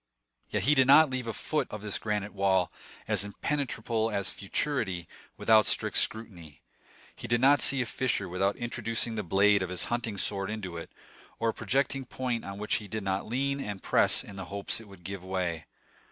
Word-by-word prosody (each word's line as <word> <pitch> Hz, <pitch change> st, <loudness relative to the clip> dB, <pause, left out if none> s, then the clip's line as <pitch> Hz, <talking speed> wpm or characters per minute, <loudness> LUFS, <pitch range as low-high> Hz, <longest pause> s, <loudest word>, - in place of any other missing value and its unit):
Yet -, -, -1 dB
he 150 Hz, -, +5 dB
did 130 Hz, -2 st, +4 dB
not 150 Hz, +1 st, +7 dB
leave 130 Hz, -2 st, -3 dB
a -, -, -1 dB
foot 155 Hz, +7 st, -2 dB
of 105 Hz, -1 st, -7 dB
this 105 Hz, -2 st, -1 dB
granite 105 Hz, -1 st, -2 dB
wall, 95 Hz, -2 st, +2 dB, 0.4 s
as -, -, +2 dB
impenetrable 115 Hz, -1 st, -1 dB
as 100 Hz, -3 st, 0 dB
futurity, 100 Hz, -, -2 dB, 0.3 s
without 110 Hz, -2 st, +5 dB
strict -, -, +1 dB
scrutiny; 85 Hz, -, -2 dB, 0.5 s
he -, -, -8 dB
did 120 Hz, 0 st, +2 dB
not 140 Hz, +3 st, +5 dB
see 135 Hz, -2 st, +4 dB
a -, -, -6 dB
fissure 120 Hz, -4 st, -1 dB
without 95 Hz, +3 st, 0 dB
introducing 115 Hz, -1 st, -3 dB
the 110 Hz, -, -2 dB
blade 100 Hz, +2 st, +4 dB
of 95 Hz, -, -2 dB
his 90 Hz, -1 st, -1 dB
hunting 115 Hz, -4 st, -2 dB
sword 95 Hz, 0 st, -1 dB
into 100 Hz, -5 st, -5 dB
it, 85 Hz, -, -7 dB, 0.5 s
or 115 Hz, -, +1 dB
a -, -, -1 dB
projecting 135 Hz, 0 st, 0 dB
point 125 Hz, -3 st, -3 dB
on 100 Hz, 0 st, -7 dB
which 105 Hz, +1 st, 0 dB
he 105 Hz, -, -8 dB
did 110 Hz, 0 st, -4 dB
not 95 Hz, 0 st, -1 dB
lean 140 Hz, +4 st, -1 dB
and 105 Hz, -7 st, -5 dB
press -, -, +3 dB
in 100 Hz, -, -11 dB
the 95 Hz, -, -5 dB
hopes 100 Hz, +3 st, -1 dB
it 110 Hz, -, -14 dB
would 95 Hz, -3 st, -15 dB
give 95 Hz, 0 st, -6 dB
way. 90 Hz, -4 st, -3 dB
105 Hz, 195 wpm, -29 LUFS, 95-120 Hz, 0.5 s, not